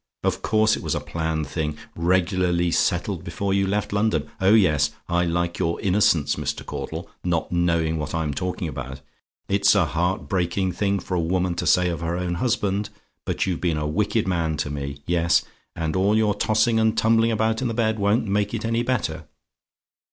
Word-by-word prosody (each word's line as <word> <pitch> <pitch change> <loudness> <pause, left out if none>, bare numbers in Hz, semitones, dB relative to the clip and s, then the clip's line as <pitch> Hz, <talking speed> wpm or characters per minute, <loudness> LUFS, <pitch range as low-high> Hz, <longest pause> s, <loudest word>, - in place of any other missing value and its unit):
Of - - 0
course 110 0 +3
it - - -7
was - - -1
a - - 0
planned 80 +1 -2
thing! 75 +1 -3 0.2
regularly 90 0 +1
settled - - 0
before 100 -1 -2
you 100 0 +2
left 105 +1 -1
London. 100 -7 0
Oh 95 +3 +5
yes! 75 -8 +3 0.2
I 85 0 +1
like 85 0 -1
your 85 -2 0
innocence, 90 -7 +2
Mr. - - -3
Caudle; - - -5 0.2
not 85 -2 -1
knowing 85 -2 +1
what 75 +1 -4
I'm 80 -3 -1
talking 90 +3 -3
about. 65 -2 -6 0.5
It's 100 +1 +4
a 100 -4 +4
heart 90 +4 -1
breaking 90 0 0
thing 100 +1 0
for 95 0 -6
a 90 - +1
woman 90 +2 0
to 85 0 -3
say 90 +2 +4
of 85 -1 -4
her 85 +1 -2
own 90 -1 -2
husband; 105 -4 0 0.4
but - - 0
you've 90 -3 -2
been 85 -4 0
a 75 - -2
wicked 105 +6 0
man 85 -4 0
to 75 -1 -2
me. 70 0 -5
Yes: 85 -1 +2 0.3
and 80 -1 -2
all 100 +3 +3
your 110 -2 +3
tossing 110 +2 +2
and 110 0 +2
tumbling 115 +1 +3
about 110 +1 0
in 130 - 0
the 115 - -3
bed 110 -2 +1
won't 105 +4 +2
make 105 +2 0
it 115 - -4
any 115 +1 +1
better. 105 -11 -2
90 Hz, 195 wpm, -23 LUFS, 80-105 Hz, 0.5 s, Oh